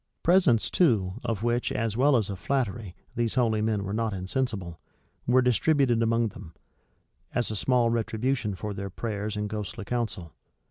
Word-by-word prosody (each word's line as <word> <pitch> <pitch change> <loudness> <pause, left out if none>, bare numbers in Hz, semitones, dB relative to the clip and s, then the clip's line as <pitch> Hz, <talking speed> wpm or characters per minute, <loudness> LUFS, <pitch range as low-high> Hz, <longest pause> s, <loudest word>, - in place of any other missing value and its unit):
Presents 170 - +4
too, 110 - +3
of 115 -3 -2
which, 120 +1 0
as 110 -1 -1
well 135 +2 +4
as 105 -3 -1
of 95 - -6
flattery, 115 -4 -2 0.2
these 115 -1 -1
holy 115 -4 +2
men 105 -2 0
were 100 +1 -4
not 110 -1 -1
insensible, 95 -3 -3 0.5
were 125 +1 +5
distributed 125 -1 +3
among 115 0 +2
them, 85 -4 -12 0.8
as 120 -2 0
a - - -3
small 120 +2 +2
retribution 115 -1 -1
for 105 +2 -5
their 100 0 -5
prayers 105 +1 -4
and 105 0 -1
ghostly 105 0 -5
counsel. 110 -9 -3
115 Hz, 160 wpm, -27 LUFS, 105-120 Hz, 0.8 s, were